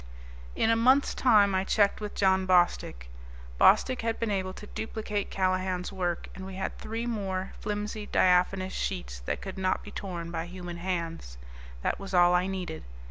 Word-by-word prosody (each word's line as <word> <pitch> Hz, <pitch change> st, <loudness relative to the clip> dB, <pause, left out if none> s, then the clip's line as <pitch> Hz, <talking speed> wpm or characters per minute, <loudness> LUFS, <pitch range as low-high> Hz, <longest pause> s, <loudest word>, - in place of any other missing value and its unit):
In 225 Hz, -, +2 dB
a -, -, +4 dB
month's 260 Hz, +5 st, +4 dB
time 210 Hz, -6 st, +4 dB
I 190 Hz, 0 st, +2 dB
checked 200 Hz, +1 st, +2 dB
with 210 Hz, -1 st, -5 dB
John 190 Hz, -1 st, +2 dB
Bostick. 175 Hz, -, +2 dB, 0.5 s
Bostick 255 Hz, -1 st, +5 dB
had 225 Hz, 0 st, -2 dB
been 230 Hz, -2 st, -1 dB
able 190 Hz, -2 st, -1 dB
to 210 Hz, -, -10 dB
duplicate 210 Hz, -1 st, -4 dB
Callahan's 185 Hz, 0 st, -1 dB
work, 175 Hz, -3 st, -2 dB
and 190 Hz, -, -9 dB
we 190 Hz, 0 st, -7 dB
had 190 Hz, -, -3 dB
three 225 Hz, +2 st, -4 dB
more, 195 Hz, -5 st, -3 dB
flimsy, 210 Hz, 0 st, -4 dB
diaphanous 185 Hz, +1 st, +2 dB
sheets -, -, -3 dB
that -, -, -2 dB
could 190 Hz, -1 st, -6 dB
not 185 Hz, 0 st, 0 dB
be 205 Hz, -, -10 dB
torn 170 Hz, -5 st, -5 dB
by 165 Hz, 0 st, -3 dB
human 175 Hz, -1 st, -7 dB
hands. 170 Hz, -, -4 dB, 0.5 s
That -, -, 0 dB
was 195 Hz, -1 st, -5 dB
all 175 Hz, 0 st, +6 dB
I 180 Hz, +1 st, +2 dB
needed. 185 Hz, -4 st, -4 dB
190 Hz, 175 wpm, -28 LUFS, 180-210 Hz, 0.5 s, all